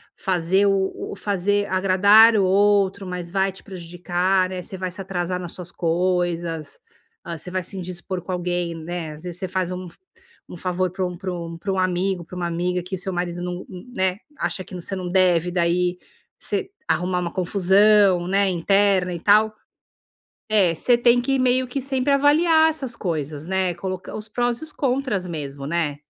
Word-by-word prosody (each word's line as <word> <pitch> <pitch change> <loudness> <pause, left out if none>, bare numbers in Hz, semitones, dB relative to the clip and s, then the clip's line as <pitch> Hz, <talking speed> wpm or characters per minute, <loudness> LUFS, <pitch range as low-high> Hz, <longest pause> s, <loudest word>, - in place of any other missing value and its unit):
fazer 190 +1 +1
o 195 -1 -1
fazer 205 +1 0
agradar 200 +4 +6
o 200 - +3
outro 200 0 +3
mas 180 -1 -5
vai 195 +1 +1
te 190 - -12
prejudicar, 180 +1 -1
né. 185 -1 -5
Você 190 - -6
vai 185 0 -3
se 185 +2 -9
atrasar 180 -1 -3
nas 175 -2 -6
suas 180 -1 -7
coisas, 175 - -1 0.4
ah, 170 -1 -6
você 180 - -7
vai 185 0 -1
se 190 +3 -7
indispor 180 0 -5
com 185 - -6
alguém, 175 -1 -2
né, 165 0 -5
às 150 - -12
vezes 175 -1 -6
você 190 - -3
faz 185 0 -2
um 180 0 -5 0.6
um - - -8
favor 185 +1 -1
pra 185 0 -2
um 180 - -4
pra 185 +1 -5
um 170 -1 -6
pra 195 +4 -3
um 190 - -1
amigo, 185 -1 0
pra 180 - -11
uma 175 -1 -2
amiga 180 +1 -1
que 185 +2 -5
o - - -5
seu 185 +1 -3
marido 175 0 -3
não 180 0 -4 0.3
né, 185 -2 +2 0.2
acha 185 - -2
que - - -13
você 180 +2 -5
não 185 -1 -4
deve 180 -2 +3
daí 175 0 +1 0.4
você 385 - -3 0.2
arrumar 180 +2 0
uma 175 -1 -3
confusão, 190 0 +4
né, 195 +1 +2
interna 185 +1 +2
e 170 - -5
tal. 215 +4 +4 1.0
É 190 -6 +4
você 240 +9 +3
tem 240 0 +4
que 270 +2 0
meio 255 0 +2
que 275 +2 -3
sempre 270 +1 0
avaliar 315 +3 +5
essas 270 -6 -4
coisas, 155 -5 -3
né, 190 -1 0
colocar 185 +1 -6
os 215 0 -6
prós 240 +2 0
e - - -6
os 310 - -7
contras 255 -9 -1
mesmo, 140 -5 -6
né? 155 -2 -1
185 Hz, 190 wpm, -22 LUFS, 175-200 Hz, 1.0 s, agradar